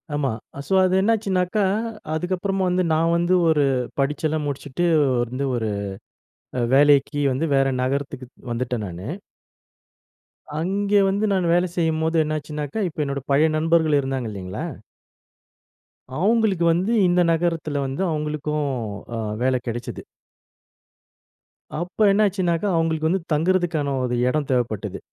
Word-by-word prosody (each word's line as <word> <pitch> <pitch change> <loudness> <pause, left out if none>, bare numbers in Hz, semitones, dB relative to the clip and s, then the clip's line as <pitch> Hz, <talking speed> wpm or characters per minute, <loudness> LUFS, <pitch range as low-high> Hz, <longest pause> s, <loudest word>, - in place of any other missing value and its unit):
ஆமா. 140 -4 0 0.4
ஸோ - - -1
அது 185 0 +2
என்னாச்சுன்னாக்கா, 200 -2 +1 0.5
அதுக்கப்புறமா 185 +3 -1
வந்து 180 0 +1
நான் 165 +1 +2
வந்து 175 +2 +1 0.2
ஒரு 150 -2 +3 0.4
படிச்செல்லாம் 150 +2 0
முடிச்சுட்டு 145 +3 -3 0.4
வந்து 130 +4 -3
ஒரு 110 -2 -1 0.9
அ - - +1
வேலைக்கி 145 0 +4
வந்து 150 +6 -1
வேற 135 0 +3
நகரத்துக்குத் 130 -1 -4
வந்துட்டேன் 120 -2 -2
நானு. 90 +3 -7 1.5
அங்கே 200 +4 +1
வந்து 200 +2 0
நானு 185 -2 +1
வேலை 175 +1 +3
செய்யும்போது 160 0 +1
என்னாச்சுனாக்கா, 150 +2 -4
இப்ப 150 -1 -3
என்னோட 140 -1 -3
பழைய 155 +3 +4
நண்பர்கள் 160 -1 +3
இருந்தாங்க 135 -3 -3
இல்லைங்களா? 95 -2 -5 1.5
அவங்களுக்கு 205 -1 +2
வந்து 185 +6 0 0.2
இந்த 175 0 +3
நகரத்துல 165 -4 0
வந்து 135 +6 -3
அவங்களுக்கும் 150 -1 -2 0.5
ஆ - - -3 0.3
வேல 130 0 +2
கெடைச்சது. 120 +1 -5 1.8
அப்ப 180 +5 +1
என்னாச்சுனாக்கா, 195 -3 +1
அவுங்களுக்கு 160 -1 +1
வந்து 190 0 0
தங்குறத்துக்கான 165 -3 +1
ஒரு 125 -1 -1
இடம் 145 +1 0
தேவைப்பட்டது. 110 -5 -1
155 Hz, 115 wpm, -23 LUFS, 140-180 Hz, 1.8 s, வேலைக்கி